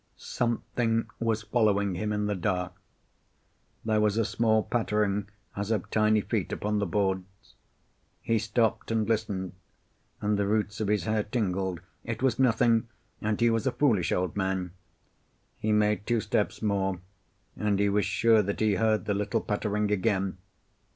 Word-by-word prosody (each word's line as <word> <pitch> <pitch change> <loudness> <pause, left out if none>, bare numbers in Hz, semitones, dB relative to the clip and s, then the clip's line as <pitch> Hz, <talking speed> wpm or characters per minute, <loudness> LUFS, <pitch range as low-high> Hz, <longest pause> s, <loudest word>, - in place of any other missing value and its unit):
Something 115 -1 -1
was 110 -2 0
following 105 -3 +2
him 105 +4 -2
in 105 0 0
the 105 - 0
dark. 90 -1 -1 1.1
There 110 -1 +2
was 105 0 +2
a 115 - +2
small 110 -1 +2
pattering, 105 -3 0 0.3
as 100 +1 -3
of 110 -5 -1
tiny 110 0 +3
feet - - -2
upon 105 0 -1
the 100 - 0
boards. 95 +1 -2 0.7
He 115 -1 +1
stopped 110 +1 0
and 110 -2 0
listened, 105 -5 -1 0.7
and 105 0 0
the 100 - +1
roots 105 0 0
of 105 - 0
his 105 0 +1
hair 110 -1 +1
tingled. 95 -5 -2 0.2
It - - -4
was 130 -1 +2
nothing, 115 -2 +3 0.3
and 105 -1 -1
he 120 -1 +4
was 115 +3 0
a - - +2
foolish 115 - +2
old 90 -1 0
man. 95 -2 -1 0.9
He 110 - 0
made 105 -1 +2
two 120 -1 +2
steps 110 0 -1
more, 95 -3 0 0.6
and 105 -2 0
he 100 +1 +2
was 100 +1 +2
sure 115 -2 +4
that 100 0 -3
he 110 -1 +3
heard 110 -3 +1
the 105 - 0
little 105 +2 0
pattering 105 0 -1
again. 95 -2 0
105 Hz, 160 wpm, -28 LUFS, 100-110 Hz, 1.1 s, he